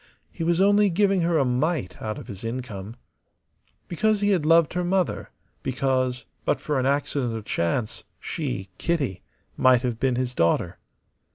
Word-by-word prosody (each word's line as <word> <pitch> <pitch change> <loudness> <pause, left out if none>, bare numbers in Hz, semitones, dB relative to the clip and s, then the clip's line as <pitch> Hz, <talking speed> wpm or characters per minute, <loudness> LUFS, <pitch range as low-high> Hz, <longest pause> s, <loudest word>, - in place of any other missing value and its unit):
He - - -5
was 170 +1 +2
only 205 +1 +5
giving 195 +1 +2
her 170 -1 +2
a 140 - +3
mite 130 - -1
out 110 -1 -3
of - - -8
his 100 0 -8
income. 115 -3 -5 0.9
Because 215 +4 +1
he 205 0 +3
had 170 -6 +1
loved 165 -1 +5
her 180 0 -1
mother; 185 0 0 0.3
because, 130 -1 -1 0.2
but - - +1
for 150 -3 -1
an 130 - +1
accident 140 -4 0
of 110 -2 -6
chance, 105 +6 -1 0.2
she, 95 +10 -4
Kitty, 140 - -1 0.4
might 130 -1 +5
have 120 -3 -2
been 130 -1 +1
his 125 0 -2
daughter. 85 -7 +1
130 Hz, 165 wpm, -25 LUFS, 120-170 Hz, 0.9 s, only